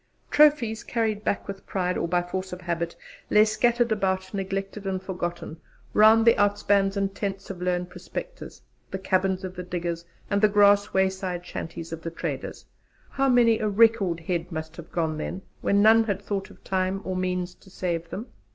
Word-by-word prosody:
Trophies, 275 -7 +4
carried 220 -3 -1
back 200 - -1
with 195 -1 -8
pride 180 -2 -1
or - - -1
by 175 +1 +1
force 185 +1 -4
of 180 0 -7
habit, 170 -1 -2 0.3
lay 210 0 +6
scattered 235 +2 +2
about, 190 -2 0
neglected 195 +1 -4
and 190 -1 -1
forgotten, 175 -3 -5 0.4
round 220 +1 +6
the 230 - +8
outspans, 205 -1 +2
the 200 0 +1
tents 195 0 -5
of 180 -2 -9
lone 180 0 0
prospectors, - - -8 0.3
the 190 - -3
cabins 190 0 0
of 185 0 -6
the 180 - -5
diggers, 175 -1 -3 0.2
and 200 0 0
the 215 - +7
grass 205 0 +5
wayside 190 -2 0
shanties 165 -1 -6
of 165 - -6
the 165 - -4
traders. 165 - -5 0.5
How 270 0 +1
many 235 -3 +5
a 215 - 0
'record' 205 -5 +3
head 170 +1 -3
must 160 -1 -5
have 170 -1 -10
gone 160 -2 -1
then, 185 +4 -5 0.2
when 200 0 +3
none 225 +1 +6
had 200 -3 -1
thought 200 -1 -4
of - - -17
time 190 0 -1
or 185 - -3
means 180 -1 -2
to 190 - -20
save 170 -3 -3
them! 215 - -5
190 Hz, 185 wpm, -26 LUFS, 180-210 Hz, 0.5 s, the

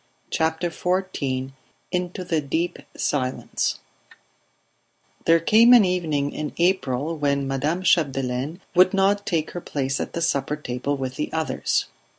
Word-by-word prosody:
CHAPTER 160 +2 0
XIV 160 -9 -2 0.4
INTO 180 0 -2
THE 165 -3 0
DEEP 160 +5 -2 0.2
SILENCE 130 -3 -1 1.5
There 165 0 +5
came 225 +8 +6
an 235 -5 +8
evening 155 -6 0
in 150 -1 -5
April 165 -4 +1
when 140 -2 0
Madame 150 +7 -1
Chapdelaine 135 -1 +1
would 185 +1 +5
not 200 +1 +2
take 160 -2 0
her 175 - -6
place 135 -3 -2
at - - -4
the 170 - -3
supper 145 -1 0
table 140 0 -3
with 130 0 -4
the 150 - -3
others. 160 -1 0
160 Hz, 135 wpm, -24 LUFS, 140-180 Hz, 1.5 s, an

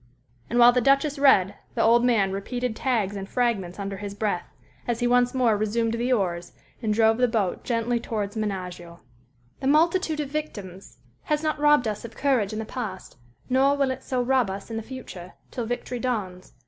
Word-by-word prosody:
And 240 - -1
while 240 0 +8
the 250 0 +1
Duchess 275 +3 +2
read, 200 -9 +5 0.2
the - - +2
old 235 +1 +5
man 220 -6 +3
repeated 245 +4 -3
tags 220 -7 0
and 195 0 -6
fragments 220 -8 -1
under 195 -1 -4
his 200 0 -6
breath, 205 -4 -2 0.4
as 235 -1 -1
he 245 - 0
once 245 +1 +3
more 240 -4 +3
resumed 225 +2 0
the 240 +2 -1
oars 175 -7 -1 0.3
and 220 -3 0
drove 220 +1 +3
the 250 - +4
boat 215 -6 -1
gently 235 0 0
towards 215 -2 -4
Menaggio. 180 -5 -5 0.6
"_The 270 - +1
multitude 325 +1 +2
of 290 -2 -2
victims 205 -11 -6 0.3
has 300 0 0
not 310 -1 -1
robbed 295 -4 +4
us 210 -1 -3
of 230 -1 -10
courage 255 -8 +1
in 215 - -4
the 220 - -3
past, 215 - -6 0.3
nor 270 +2 +3
will 275 -2 +1
it 260 0 -5
so 255 -2 -1
rob 255 -4 +2
us 195 +4 -6
in 225 - -3
the - - -2
future 215 -7 -9 0.2
till 240 -3 -4
victory 245 +1 -4
dawns. 205 -8 -3
230 Hz, 195 wpm, -25 LUFS, 200-255 Hz, 0.6 s, while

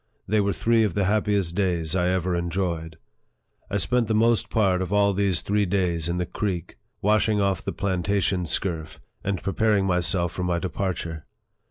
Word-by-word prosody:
They 105 +1 +2
were 100 0 +1
three 115 +2 +2
of 105 - -1
the 100 -2 +1
happiest 100 -3 +1
days 90 -4 0
I 90 -1 +2
ever 90 -1 0
enjoyed. 85 -2 -2 0.7
I 100 - 0
spent 120 +4 +1
the 110 - +1
most 115 +1 +2
part 95 -4 +2
of 95 0 -3
all 100 -1 +3
these 95 -3 +1
three 105 0 +1
days 85 -3 0
in 85 - -1
the 90 - -1
creek, 90 -2 -4 0.2
washing 105 +1 +3
off 100 -3 +1
the - - -3
plantation 95 -1 0
scurf, 80 -4 -2 0.3
and 95 -2 -2
preparing 100 0 +2
myself 90 -1 +1
for 90 - -4
my 90 -1 0
departure. 85 -3 -3
95 Hz, 175 wpm, -25 LUFS, 85-100 Hz, 0.7 s, all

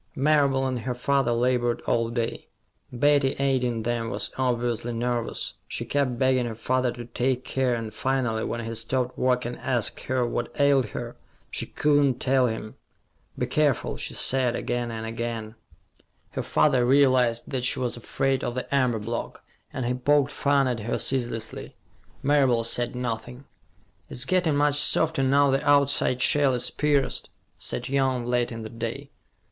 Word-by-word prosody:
Marable 140 -2 +2
and 130 -2 -1
her 125 +1 -3
father 135 0 +1
labored 120 0 +1
all 115 -1 +1
day. 115 -1 -3 0.4
Betty, 140 +1 +2
aiding 125 -4 0
them, 115 0 -1
was - - -2
obviously 120 -2 -1
nervous. 120 0 -2
She - - -4
kept 135 -4 0
begging 130 -1 +2
her 115 - -5
father 125 +2 0
to 120 -1 -8
take 125 +2 -1
care, 130 -2 0
and 115 -2 -5
finally, 120 -3 -1
when 115 -1 -3
he 115 - -4
stopped 125 +3 -1
work 125 -1 +1
and 120 0 -5
asked 120 -4 -1
her 130 -1 0
what 120 0 -3
ailed 140 -4 +4
her, - - -6 0.3
she - - -4
could 145 -1 +2
not 130 -3 +1
tell 130 -1 +3
him. 110 -1 -5 0.6
"Be - - 0
careful," 150 -5 +1
she - - -4
said, 125 -2 +2
again 120 -1 -2
and 110 -1 -5
again. 115 -1 -4 0.8
Her - - -3
father 130 -5 +2
realized 125 -3 +3
that 130 -3 -2
she 125 - +2
was 125 -2 -2
afraid 135 +3 -1
of 120 - -3
the 130 - -4
amber 125 -4 +2
block, 115 +2 -5 0.3
and 130 - -3
he 125 - 0
poked 140 +2 +2
fun 140 -2 +2
at 125 -2 -1
her 110 +3 -2
ceaselessly. 120 -4 -3 0.5
Marable 135 -5 +3
said 120 +2 -1
nothing. 125 +2 -5 0.6
"It's 125 - -1
getting 180 -5 +2
much 145 0 +2
softer, 160 0 +3
now 140 +1 +4
the 135 +1 +1
outside 140 -3 +3
shell 145 -4 +4
is 125 - 0
pierced," 145 -2 0 0.3
said 125 - -3
Young, 130 -2 0
late 120 0 0
in 115 -1 -6
the 110 - -6
day. 115 -1 -5
125 Hz, 165 wpm, -25 LUFS, 120-135 Hz, 0.8 s, ailed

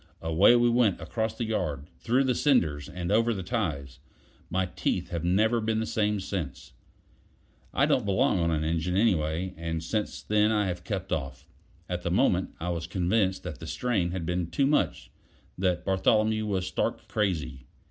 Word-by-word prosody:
Away 80 +8 +5
we 120 0 +4
went 115 -6 +3
across 110 +6 -3
the - - -2
yard, 75 -10 -2
through 125 +4 +2
the 130 -1 +2
cinders, 80 - +1
and 90 0 -4
over 115 +2 +3
the 95 - -4
ties; 75 - -3 0.5
my 95 +1 0
teeth 90 - -2
have 85 -2 -3
never 110 +7 +2
been 110 0 0
the 110 - -1
same 105 -2 0
since. 90 -8 -5 1.0
I - - +3
don't 125 - +2
belong 95 -2 +2
on 85 -1 +1
an 80 -2 0
engine, 85 +3 -1
anyway, 90 -4 +1
and 80 0 -4
since 105 +5 -3
then 105 0 +2
I 105 -2 +2
have 90 -2 -4
kept 95 -1 -4
off. 65 -4 -4 0.4
At - - -3
the - - -2
moment, - - +1
I 90 - -3
was 85 -2 -3
convinced 95 +1 0
that 90 -4 -6
the 80 - -8
strain 105 -7 0
had 90 -1 -4
been 90 0 -1
too 140 - +1
much, - - 0 0.4
that 90 -1 0
Bartholomew 110 +3 +2
was 95 -3 -1
stark - - -2
crazy. 80 - -2
95 Hz, 180 wpm, -28 LUFS, 85-110 Hz, 1.0 s, Away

